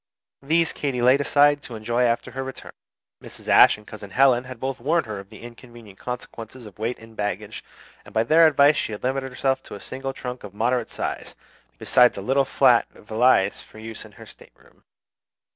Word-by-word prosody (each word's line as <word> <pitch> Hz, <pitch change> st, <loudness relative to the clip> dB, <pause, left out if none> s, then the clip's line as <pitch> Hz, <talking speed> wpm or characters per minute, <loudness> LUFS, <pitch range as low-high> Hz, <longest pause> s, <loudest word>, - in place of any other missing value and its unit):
These 160 Hz, +4 st, +1 dB
Katy 135 Hz, -4 st, -3 dB
laid 130 Hz, +3 st, +4 dB
aside 145 Hz, +2 st, +3 dB
to 120 Hz, -, -9 dB
enjoy 120 Hz, +3 st, -2 dB
after 120 Hz, -1 st, 0 dB
her 135 Hz, 0 st, -5 dB
return. 130 Hz, 0 st, -9 dB, 0.5 s
Mrs. -, -, -12 dB
Ashe -, -, +6 dB
and 105 Hz, -, -17 dB
Cousin 105 Hz, -2 st, -10 dB
Helen 130 Hz, +2 st, +3 dB
had 130 Hz, -2 st, -10 dB
both 135 Hz, +1 st, -4 dB
warned 160 Hz, +7 st, 0 dB
her 105 Hz, -3 st, -6 dB
of 100 Hz, 0 st, -12 dB
the 110 Hz, +1 st, -13 dB
inconvenient 120 Hz, -4 st, -13 dB
consequences 125 Hz, -1 st, -8 dB
of 105 Hz, -1 st, -14 dB
weight 115 Hz, +3 st, -2 dB
in 115 Hz, 0 st, -15 dB
baggage; 105 Hz, -1 st, -5 dB, 0.4 s
and -, -, -15 dB
by 110 Hz, -, +1 dB
their 160 Hz, +7 st, +5 dB
advice 145 Hz, 0 st, +4 dB
she 110 Hz, -, -2 dB
had 105 Hz, -, -8 dB
limited 135 Hz, +1 st, -2 dB
herself 135 Hz, +1 st, -1 dB
to -, -, -10 dB
a -, -, -9 dB
single 135 Hz, +4 st, -6 dB
trunk 125 Hz, -1 st, -7 dB
of 100 Hz, -1 st, -10 dB
moderate 120 Hz, +2 st, 0 dB
size, -, -, -5 dB, 0.4 s
besides 125 Hz, -2 st, +3 dB
a -, -, -4 dB
little 135 Hz, +1 st, +2 dB
flat -, -, +3 dB
valise 110 Hz, -2 st, +1 dB
for -, -, -17 dB
use 110 Hz, 0 st, -8 dB
in -, -, -15 dB
her -, -, -13 dB
stateroom. -, -, -20 dB
125 Hz, 195 wpm, -23 LUFS, 110-135 Hz, 0.5 s, Ashe